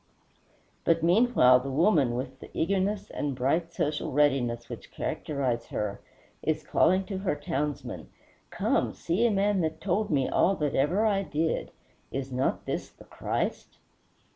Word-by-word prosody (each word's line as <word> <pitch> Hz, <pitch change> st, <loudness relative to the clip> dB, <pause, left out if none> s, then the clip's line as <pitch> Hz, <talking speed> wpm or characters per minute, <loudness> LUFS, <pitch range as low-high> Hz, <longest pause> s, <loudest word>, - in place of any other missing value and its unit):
But 165 Hz, -1 st, +2 dB
meanwhile 175 Hz, -, +5 dB
the 135 Hz, +2 st, -5 dB
woman, 145 Hz, -, +3 dB
with 130 Hz, +2 st, -5 dB
the -, -, -11 dB
eagerness 195 Hz, +3 st, 0 dB
and 145 Hz, -2 st, -2 dB
bright, 160 Hz, +7 st, 0 dB
social 150 Hz, -1 st, -2 dB
readiness 130 Hz, -5 st, +1 dB
which -, -, -9 dB
characterize 130 Hz, -6 st, -2 dB
her, 100 Hz, -1 st, -3 dB, 0.4 s
is -, -, -1 dB
calling 190 Hz, +1 st, +3 dB
to 195 Hz, -2 st, -4 dB
her 190 Hz, -5 st, 0 dB
townsmen, 145 Hz, 0 st, -4 dB, 0.4 s
"Come, -, -, 0 dB
see 190 Hz, +8 st, +1 dB
a -, -, +2 dB
man 200 Hz, -1 st, +2 dB
that 160 Hz, -1 st, -2 dB
told 205 Hz, +3 st, 0 dB
me 135 Hz, -4 st, +2 dB
all 195 Hz, -, +3 dB
that 150 Hz, -5 st, -1 dB
ever 175 Hz, +11 st, +2 dB
I 200 Hz, -3 st, +2 dB
did. 160 Hz, -3 st, -1 dB, 0.4 s
Is 135 Hz, 0 st, -4 dB
not 130 Hz, +1 st, -1 dB
this -, -, -3 dB
the -, -, -17 dB
Christ?" -, -, -3 dB
155 Hz, 150 wpm, -28 LUFS, 135-190 Hz, 0.4 s, meanwhile